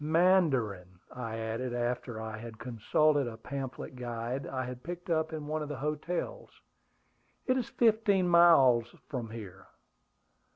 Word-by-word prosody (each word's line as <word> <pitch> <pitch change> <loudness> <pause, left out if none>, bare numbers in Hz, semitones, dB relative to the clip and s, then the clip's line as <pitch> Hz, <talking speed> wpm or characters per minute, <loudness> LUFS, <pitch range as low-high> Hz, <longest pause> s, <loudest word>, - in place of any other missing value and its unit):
"Mandarin," 145 - +2 0.2
I 115 -3 -5
added, 115 +3 -3
after 120 -1 -2
I 110 -1 -5
had 115 -1 -9
consulted 130 +5 +1
a 115 -1 -6
pamphlet 135 +1 -6
guide 120 +2 -4
I 130 -1 -3
had 125 0 -7
picked 175 +3 -6
up 160 0 +1
in 155 -2 -5
one 155 +1 -2
of 150 - -4
the 145 - -4
hotels. 155 - -3 1.0
"It 255 - +2
is 255 -3 -1
fifteen 215 -5 +3
miles 135 -9 +6
from 125 -6 -4
here." 100 -4 -9
130 Hz, 140 wpm, -31 LUFS, 115-160 Hz, 1.0 s, miles